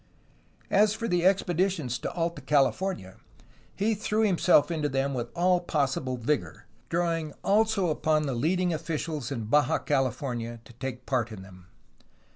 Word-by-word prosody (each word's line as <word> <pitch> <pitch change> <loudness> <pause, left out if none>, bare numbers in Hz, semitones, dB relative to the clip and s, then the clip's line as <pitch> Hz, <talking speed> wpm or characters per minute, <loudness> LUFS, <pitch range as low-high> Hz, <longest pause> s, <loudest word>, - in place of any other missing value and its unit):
As 210 +1 +4
for 230 +1 -3
the 175 -3 +1
expeditions 180 -8 +1
to - - -4
Alta 165 -3 -2
California, 140 - 0 0.6
he 215 +3 +1
threw 215 +1 0
himself 180 -5 +4
into 155 -3 -1
them 135 +1 0
with 120 -2 -3
all 180 +1 +3
possible 135 -6 -1
vigor, 135 +5 -2 0.2
drawing 165 -3 -1
also 210 -2 +2
upon 155 0 +1
the 140 -3 -2
leading 175 +8 +1
officials 155 -4 -3
in 120 -5 -3
Baja 145 +5 +3
California 125 -4 -2
to 120 - -15
take 125 +1 -6
part 120 -4 0
in 100 -3 -8
them. 90 -1 -15
150 Hz, 145 wpm, -27 LUFS, 130-180 Hz, 0.6 s, As